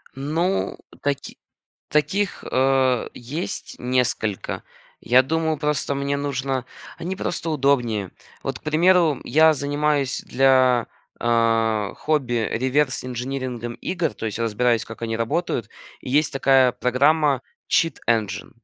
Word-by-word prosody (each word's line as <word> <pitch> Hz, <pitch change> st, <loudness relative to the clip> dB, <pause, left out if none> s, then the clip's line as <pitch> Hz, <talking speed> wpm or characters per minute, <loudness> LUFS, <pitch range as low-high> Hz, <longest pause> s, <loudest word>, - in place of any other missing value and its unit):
Ну, 165 Hz, +8 st, -1 dB, 0.2 s
таки 140 Hz, -1 st, -3 dB, 0.5 s
таких, 195 Hz, +7 st, 0 dB
э, 130 Hz, -1 st, +2 dB
есть 140 Hz, +9 st, -5 dB
несколько, 125 Hz, -5 st, -1 dB, 0.4 s
я 125 Hz, +2 st, +5 dB
думаю, 160 Hz, +2 st, 0 dB
просто 150 Hz, -1 st, -1 dB
мне 140 Hz, +1 st, -1 dB
нужно, 135 Hz, -2 st, -2 dB, 0.4 s
они 185 Hz, +3 st, -3 dB
просто 170 Hz, -3 st, -3 dB
удобнее, 125 Hz, -, +1 dB, 0.3 s
вот -, -, -3 dB
к -, -, -33 dB
примеру 165 Hz, -1 st, +3 dB
я 160 Hz, +1 st, +5 dB
занимаюсь 145 Hz, -1 st, 0 dB
для, 130 Hz, -2 st, +3 dB, 0.3 s
э, 115 Hz, -3 st, +2 dB
хобби 125 Hz, -7 st, 0 dB
реверс 130 Hz, +2 st, +1 dB
инжинирингом 125 Hz, -1 st, -4 dB
игр, 170 Hz, -4 st, -1 dB
то -, -, -5 dB
есть 110 Hz, -, -4 dB
разбираюсь 115 Hz, +1 st, +1 dB
как 110 Hz, 0 st, -11 dB
они 115 Hz, -1 st, -2 dB
работают, 120 Hz, -, -1 dB, 0.3 s
и 125 Hz, -, -6 dB
есть 150 Hz, +2 st, +2 dB
такая 135 Hz, -2 st, +4 dB
программа 140 Hz, +2 st, +2 dB, 0.3 s
cheat 165 Hz, -5 st, +2 dB
engine, 110 Hz, -5 st, 0 dB
135 Hz, 120 wpm, -23 LUFS, 120-150 Hz, 0.5 s, я